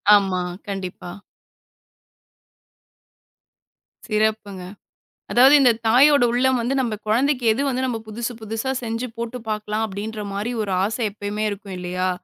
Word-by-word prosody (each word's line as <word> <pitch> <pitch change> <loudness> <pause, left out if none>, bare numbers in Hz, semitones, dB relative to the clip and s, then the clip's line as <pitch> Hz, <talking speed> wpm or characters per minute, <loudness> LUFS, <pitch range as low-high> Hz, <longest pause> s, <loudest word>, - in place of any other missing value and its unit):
ஆமா, 190 -3 +1 0.3
கண்டிப்பா. 185 -3 -5 3.0
சிறப்புங்க. 215 -3 -1 0.7
அதாவது 260 +4 +7
இந்தத் 235 -3 +3
தாயோட 275 +3 +6
உள்ளம் 255 +1 +2
வந்து 250 +4 -1
நம்ப 235 -4 -2
குழந்தைக்கு 250 +3 +1
எது 255 - -2
வந்து 260 0 -1
நம்ம 245 -3 -1
புதுசு 235 +3 -4
புதுசா 225 +4 -3
செஞ்சு 230 +2 -3
போட்டுப் 235 0 -5
பாக்கலாம், 215 +1 -2
அப்டின்ற 210 +2 -5
மாரி 205 +4 -2
ஒரு 205 - -3
ஆசை 220 +4 -2
எப்பையுமே 210 +1 -3
இருக்கும் 200 -1 -7
இல்லையா? 180 +1 -2
220 Hz, 125 wpm, -22 LUFS, 205-245 Hz, 3.0 s, அதாவது